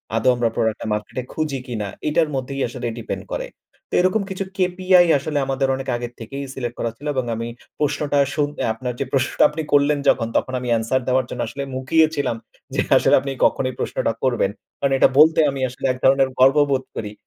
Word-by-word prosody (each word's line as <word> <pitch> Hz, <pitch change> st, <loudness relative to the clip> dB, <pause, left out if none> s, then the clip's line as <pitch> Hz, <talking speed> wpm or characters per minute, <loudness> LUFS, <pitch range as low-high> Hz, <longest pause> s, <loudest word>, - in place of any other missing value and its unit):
আদও 115 Hz, +3 st, +3 dB
আমরা 120 Hz, -1 st, +1 dB
প্রোডাক্ট 110 Hz, -1 st, 0 dB
টা -, -, -4 dB
মার্কেটে 105 Hz, +4 st, -4 dB
খুঁজি 150 Hz, -4 st, -2 dB
কিনা 110 Hz, -4 st, -3 dB, 0.2 s
এটার 155 Hz, +1 st, +2 dB
মধ্যেই 135 Hz, +1 st, -3 dB
আসলে 120 Hz, 0 st, -5 dB
ডিপেন্ড 115 Hz, -, -5 dB
করে। -, -, -3 dB, 0.4 s
তো -, -, -3 dB
এরকম 185 Hz, +4 st, +2 dB
কিছু 190 Hz, 0 st, -3 dB
কেপিআই 185 Hz, -1 st, +4 dB
আসলে 150 Hz, +2 st, -3 dB
আমাদের 135 Hz, 0 st, 0 dB
অনেক 135 Hz, 0 st, -6 dB
আগের 120 Hz, 0 st, -5 dB
থেকেই 135 Hz, +5 st, -6 dB
সিলেক্ট 120 Hz, -3 st, -4 dB
করা 115 Hz, -, -1 dB
ছিল 145 Hz, -, -8 dB
এবং 130 Hz, -2 st, 0 dB
আমি 115 Hz, +1 st, -4 dB, 0.3 s
প্রশ্নটা 145 Hz, -1 st, 0 dB
শুনে 145 Hz, -1 st, -1 dB
আপনার 125 Hz, +2 st, -4 dB
যে 140 Hz, -, -1 dB
প্রশ্নটা 130 Hz, -2 st, +2 dB
আপনি 150 Hz, +2 st, -4 dB
করলেন 145 Hz, +1 st, +4 dB
যখন 115 Hz, -3 st, +2 dB
তখন 130 Hz, -, -2 dB
আমি 125 Hz, -, -6 dB
এনসার 115 Hz, +4 st, 0 dB
দেওয়ার 130 Hz, 0 st, +2 dB
জন্য 125 Hz, -, -4 dB
আসলে 140 Hz, +5 st, -5 dB
মুখিয়ে 155 Hz, +5 st, +3 dB
ছিলাম 140 Hz, -5 st, -1 dB, 0.4 s
যে -, -, +1 dB, 0.2 s
আসলে -, -, +4 dB
আপনি 140 Hz, -, -4 dB
কখনোই 130 Hz, -1 st, +1 dB
প্রশ্নটা -, -, -1 dB
করবেন। 120 Hz, -6 st, +1 dB, 0.3 s
কারণ 140 Hz, -1 st, +1 dB
এটা -, -, +6 dB
বলতে 160 Hz, +1 st, +6 dB
আমি 135 Hz, -1 st, -5 dB
আসলে 125 Hz, -, -7 dB
এক 130 Hz, -, 0 dB
ধরনের 135 Hz, 0 st, +4 dB
গর্ববোধ 135 Hz, 0 st, +4 dB
করি। 105 Hz, -2 st, -4 dB
135 Hz, 200 wpm, -21 LUFS, 120-145 Hz, 0.4 s, এটা